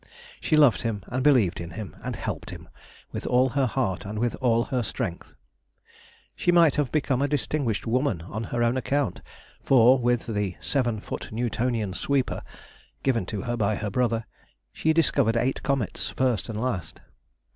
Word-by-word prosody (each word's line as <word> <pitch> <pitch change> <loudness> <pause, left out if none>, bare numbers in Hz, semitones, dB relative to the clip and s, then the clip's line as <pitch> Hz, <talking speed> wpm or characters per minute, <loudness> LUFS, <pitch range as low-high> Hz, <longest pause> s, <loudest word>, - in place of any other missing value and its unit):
She 155 - +1
loved 145 -6 +5
him, 110 -5 -3
and 130 +1 -1
believed 120 -13 +3
in 85 - -6
him, 105 +3 -7
and - - -3
helped - - -5
him, - - -9 0.4
with - - -5
all 125 +1 +3
her 135 +1 +1
heart 115 -8 -1
and 105 +2 -6
with 120 +2 0
all 120 -2 +3
her 125 0 -1
strength. 90 -5 -5 1.0
She 175 - +2
might 170 -4 +5
have 145 -4 0
become 140 -4 +1
a 140 - +2
distinguished 145 -5 -1
woman 120 - 0
on 110 +5 -5
her 120 +3 -1
own 120 +2 +2
account, 135 -4 -1 0.4
for 130 0 +5
with 120 -1 +1
the 105 -5 -2
"seven 120 -6 0
foot - - -6
Newtonian 115 -2 -1
sweeper" 135 +6 0 0.6
given 115 -8 +1
to 100 -2 -4
her 120 -1 -2
by 110 -2 +1
her 105 -1 -3
brother, 115 0 0 0.5
she 160 - +1
discovered 140 -8 +3
eight 125 +3 0
comets 135 -8 -1
first 125 -5 0
and 110 -1 -4
last. 110 -8 -3
120 Hz, 170 wpm, -26 LUFS, 110-135 Hz, 1.0 s, loved